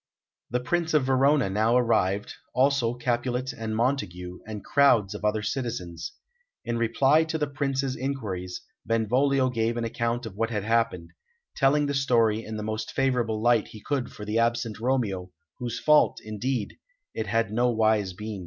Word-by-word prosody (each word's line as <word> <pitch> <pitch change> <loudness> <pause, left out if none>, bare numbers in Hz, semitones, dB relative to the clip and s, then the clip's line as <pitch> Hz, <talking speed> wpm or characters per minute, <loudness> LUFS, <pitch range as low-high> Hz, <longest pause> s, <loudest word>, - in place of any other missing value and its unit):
The 125 - 0
Prince 160 +6 0
of 145 -4 +3
Verona 135 -1 +3
now 110 +5 +2
arrived, 105 -5 +1 0.2
also 130 -3 +2
Capulet 125 +1 -1
and 110 -1 -4
Montague, 100 -8 -2
and 105 -2 -7
crowds 115 -8 +4
of 105 - -8
other 105 0 +1
citizens. 90 -9 -4 0.5
In 115 0 -1
reply 135 +7 +3
to 160 0 -2
the 150 - 0
Prince's 135 -1 -2
inquiries, 105 -10 -4 0.2
Benvolio 130 +4 +2
gave 115 0 0
an 120 - -1
account 115 +1 -2
of 105 -4 -8
what 115 +2 -1
had 105 -4 -2
happened, 115 -6 0 0.4
telling 145 +1 +3
the 140 - -1
story 115 -5 +2
in 110 0 -6
the 105 - -4
most 110 0 -3
favourable 120 -5 0
light 120 -3 +3
he 110 - -11
could 135 +3 -2
for 105 - -9
the 105 +2 0
absent 115 -1 0
Romeo, 115 -7 -1 0.3
whose 120 -2 -3
fault, 150 -1 +4
indeed, 110 +1 -3 0.4
it 110 - -3
had 115 0 0
no 120 +3 +2
wise 110 -4 +2
been. 105 +1 -6
115 Hz, 165 wpm, -26 LUFS, 110-130 Hz, 0.5 s, crowds